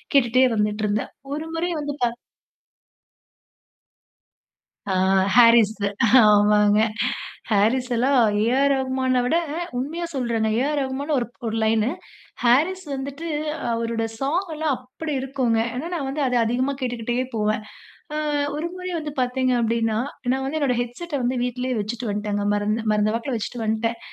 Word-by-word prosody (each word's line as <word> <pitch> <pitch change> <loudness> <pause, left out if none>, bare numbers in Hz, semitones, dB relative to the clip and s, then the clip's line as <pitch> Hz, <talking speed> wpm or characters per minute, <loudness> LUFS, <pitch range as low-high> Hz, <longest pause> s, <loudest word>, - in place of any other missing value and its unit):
கேட்டுட்டே 255 0 +5
வந்துட்டுருந்தேன். 210 0 -1 0.2
ஒரு 315 +2 -5
முறை 350 +2 -1
வந்துட்டா 285 -4 -1 2.8
ஆ, - - +1 0.4
ஹாரிஸ்து! 230 -3 +5 0.3
ஆமாங்க. 210 -1 +5 0.7
ஹாரிஸ் 230 +5 +2
எல்லாம், 260 +3 +3 0.2
ஏ.ஆர் 270 +4 +3
ரகுமான 260 -1 0
விட 320 - +2 0.4
உண்மையா 320 +7 -3
சொல்றேங்க. 235 -4 0
ஏ - - +1
ஆர் 300 -1 0
ரகுமான்னு 275 +3 -2
ஒரு 240 - -3 0.2
ஒரு 225 - -2
லைனு. 220 +2 +2 0.5
ஹாரிஸ் 320 +11 +3
வந்துட்டு 280 +5 -5 0.4
அவருட 230 0 -1
ஸாங் 330 +8 0
எல்லாம் 305 -2 0
அப்படி 260 +5 -6
இருக்குங்க. 255 -4 0
ஏன்னா 300 +7 -4
நான் 285 -5 -3
வந்து 285 +1 -2
அத 250 - +1
அதிகமா 255 +4 0
கேட்டுக்கிட்டே 240 -1 -2 0.2
போவேன். 215 0 0 0.5
அ - - -2 0.4
ஒரு 325 +3 -2
முறை 365 0 -5
வந்து 305 -2 -5
பாத்தீங்க 255 0 +1
அப்டின்னா, 225 -1 +1 0.3
நான் 265 0 -1
வந்து 310 +3 -2
என்னுடைய 250 -4 +1
ஹெட்செட்ட 290 +8 -7
வந்து 250 +1 0
வீட்லயே 250 0 -2
வச்சிட்டு 225 +2 -4
வந்ட்டேன்ங்க. 205 0 -2
மறந்து 210 +2 -1
மறந்த 210 0 +2
வாக்கில 235 +2 -3
வச்சிட்டு 225 +2 -4
வந்ட்டேன். 225 +2 -1
250 Hz, 135 wpm, -23 LUFS, 225-275 Hz, 2.8 s, கேட்டுட்டே